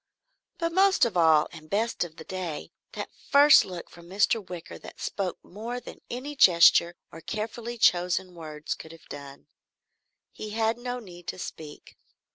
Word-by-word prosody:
But 335 -2 -1
most 385 -1 +4
of 225 -5 -3
all 160 -3 +5
and 155 -2 -12
best 220 +1 0
of 165 -2 -8
the 160 - -10
day, 180 -3 -5 0.2
that - - -6 0.2
first 285 +1 +8
look 180 -2 -7
from 170 0 -15
Mr. 205 +3 +2
Wicker 175 -2 -8
that - - -12
spoke 190 -3 -3
more 230 +6 -6
than - - -12
any 275 +5 -5
gesture 170 -5 +6 0.2
or 165 - -10
carefully 225 +4 -5
chosen 180 -2 +2
words 155 -2 -5
could 160 - -11
have 165 - -17
done. 140 -1 -10 0.9
He 215 - -7
had 225 +1 +1
no 245 0 -4
need 175 -7 -12
to - - -4
speak. 155 -4 -9
185 Hz, 165 wpm, -27 LUFS, 165-235 Hz, 0.9 s, first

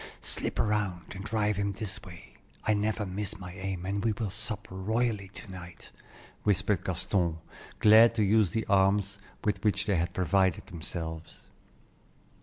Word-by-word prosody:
"Slip - - 0
around 100 -6 0
and 95 0 -7
drive 105 -1 0
him 100 0 0
this 100 -1 -5
way. 85 -3 -12 0.3
I 110 - +3
never 105 +1 0
miss 100 +2 -4
my 90 -2 -8
aim, 95 -1 -4
and 100 +1 -1
we 115 - +2
will 105 -2 -3
sup 105 -2 -3
royally 105 +2 0
to 95 +1 -10
night," 90 -2 -10 0.5
whispered 100 -2 +1
Gaston, 90 -2 0 0.4
glad 110 +2 +7
to 110 - +2
use 105 -1 +4
the 110 +6 -2
arms 100 0 +2 0.2
with 105 -2 0
which 105 -2 +2
they 100 -4 +2
had 85 +1 0
provided 95 -1 +2
themselves. 80 -3 -6
100 Hz, 155 wpm, -29 LUFS, 95-105 Hz, 0.5 s, glad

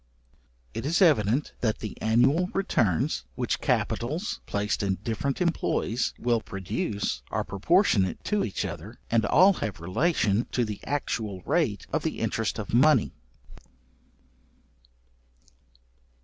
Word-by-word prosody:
It - - -4
is 160 +5 +1
evident 140 - +3
that 110 -3 +1
the 105 - -6
annual 135 +11 +3
returns, 110 - +1
which - - -1
capitals, 155 - -1
placed 105 +1 -1
in 100 -2 0
different 115 +5 -2
employs, 160 -8 0
will 120 -2 +1
produce, 100 +1 -3
are - - -1
proportionate 100 - +2
to 210 -1 0
each 100 - -2
other, 105 +10 -7
and 115 -2 +3
all 190 - +6
have 100 -6 -3
relation 105 - +1
to 125 - +1
the 105 -2 -5
actual 110 -9 -2
rate - - 0
of - - +1
the - - -3
interest 115 -1 -1
of 105 -1 -6
money. 130 0 +4
115 Hz, 120 wpm, -27 LUFS, 100-150 Hz, -, all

